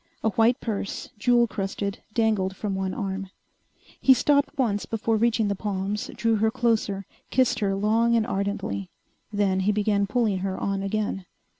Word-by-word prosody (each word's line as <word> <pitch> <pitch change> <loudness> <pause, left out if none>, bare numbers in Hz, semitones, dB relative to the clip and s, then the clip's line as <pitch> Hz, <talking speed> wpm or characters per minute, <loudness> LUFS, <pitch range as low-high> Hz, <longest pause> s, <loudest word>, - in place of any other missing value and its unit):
A 220 - +2
white 230 +5 +3
purse, 205 -3 -4
jewel 240 +2 +4
crusted, 200 -2 -3 0.2
dangled 215 -5 +1
from 205 0 -3
one 190 0 -2
arm. 195 -2 -4 0.7
He 265 - +6
stopped 285 +3 +2
once 215 -6 0
before 225 0 0
reaching 225 -1 +2
the 200 - +1
palms, 200 +1 -3
drew 230 -1 +1
her 220 +1 +3
closer, 220 -4 0 0.2
kissed 250 -2 +2
her 195 -3 +1
long 225 +4 +2
and 225 -2 +2
ardently. 195 - -2 0.4
Then 200 -2 +1
he 195 +2 +2
began 205 -1 +1
pulling 210 -3 +1
her 190 0 -2
on 195 -1 -1
again. 195 -1 -2
210 Hz, 160 wpm, -25 LUFS, 195-230 Hz, 0.7 s, He